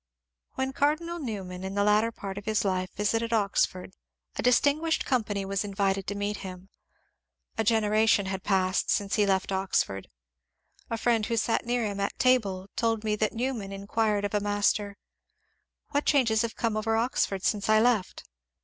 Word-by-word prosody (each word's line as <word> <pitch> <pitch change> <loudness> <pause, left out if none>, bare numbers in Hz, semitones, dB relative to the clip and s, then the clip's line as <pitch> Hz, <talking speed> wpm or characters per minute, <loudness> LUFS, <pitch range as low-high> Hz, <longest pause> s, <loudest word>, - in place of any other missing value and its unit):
When 265 0 -2
Cardinal 315 +5 0
Newman 190 - -5
in 190 +1 -5
the 200 - +2
latter 210 +2 +3
part 200 -2 -6
of 205 - -14
his 215 -1 0
life 185 -1 0
vis 205 +2 0
ited 230 0 -1
Oxford, 195 -3 0 0.4
a - - -2
distinguished 290 +6 +2
company 210 -6 -1
was 195 +1 -1
invited 195 -1 -1
to 200 - -3
meet 205 +1 -2
him. 185 0 -9 0.9
A 225 - 0
generation 215 -1 +3
had 190 0 -3
passed 190 -2 +1
since 200 -1 0
he 210 -2 +3
left 190 0 +1
Oxford. 190 - -1 0.8
A 230 - -2
friend 225 -2 +1
who 230 - -1
sat 225 +1 0
near 240 -1 0
him 200 -1 -3
at 200 - -2
table 200 -7 +2
told 225 -4 0
me 215 -1 0
that 215 0 0
Newman 235 -4 -3
inquired 205 +1 -1
of 205 - -4
a 210 - +2
master, 205 0 0 1.0
^^What 285 +1 +1
changes 230 -7 +3
have 230 -1 -3
come 225 -2 -1
over 225 +1 0
Oxford 225 -5 0
since 205 -1 0
I 215 0 +6
left?" 225 -4 +1
210 Hz, 175 wpm, -27 LUFS, 195-230 Hz, 1.0 s, I